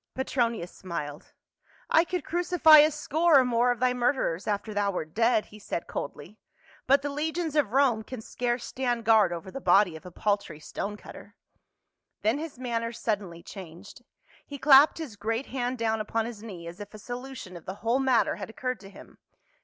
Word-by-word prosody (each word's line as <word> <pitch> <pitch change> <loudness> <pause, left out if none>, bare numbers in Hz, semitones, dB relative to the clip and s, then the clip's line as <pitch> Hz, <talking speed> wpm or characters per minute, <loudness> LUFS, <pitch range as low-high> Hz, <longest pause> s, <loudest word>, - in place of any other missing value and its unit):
Petronius 235 -8 -1
smiled. 150 -5 -7 0.3
" - - -32
I 325 - +5
could 360 -3 -3
crucify 340 -3 +6
a 300 +1 +7
score 315 +1 +3
or 260 - +5
more 245 0 +2
of 245 -2 0
thy 250 0 +2
murderers 240 - 0
after 210 +1 -2
thou 205 -1 +1
wert 160 -5 -4
dead," 230 -1 +2
he 210 - -14
said 170 - -4
coldly; 160 +9 -7 0.2
" 320 -1 -28
but 275 +1 +4
the 290 - -2
legions 315 +2 -2
of 285 -9 +2
Rome 260 -4 +3
can 255 +2 -8
scarce 240 +2 -3
stand 245 -3 -2
guard 215 -5 +5
over 175 +2 -6
the 270 - -7
body 185 -3 +4
of 160 - -10
a 180 - -9
paltry 200 -3 -2
stone 205 +6 -5
cutter." - - -13 0.9
Then 225 +7 +2
his 315 -4 -7
manner 230 -2 -2
suddenly 200 -7 -3
changed; 190 +5 -11 0.4
he 285 - -8
clapped 280 +1 +6
his 305 -10 -6
great 225 +5 -2
hand 250 -1 -3
down 225 -1 0
upon 225 +1 -1
his 230 -3 -7
knee 190 -7 -9
as 170 +3 -9
if 205 +1 -9
a - - -8
solution 245 -3 -8
of 170 - -11
the 190 - -5
whole 240 +3 +2
matter 255 -6 +2
had - - -7
occurred 255 +2 -4
to 195 - -12
him. - - -15
230 Hz, 195 wpm, -27 LUFS, 200-265 Hz, 0.9 s, a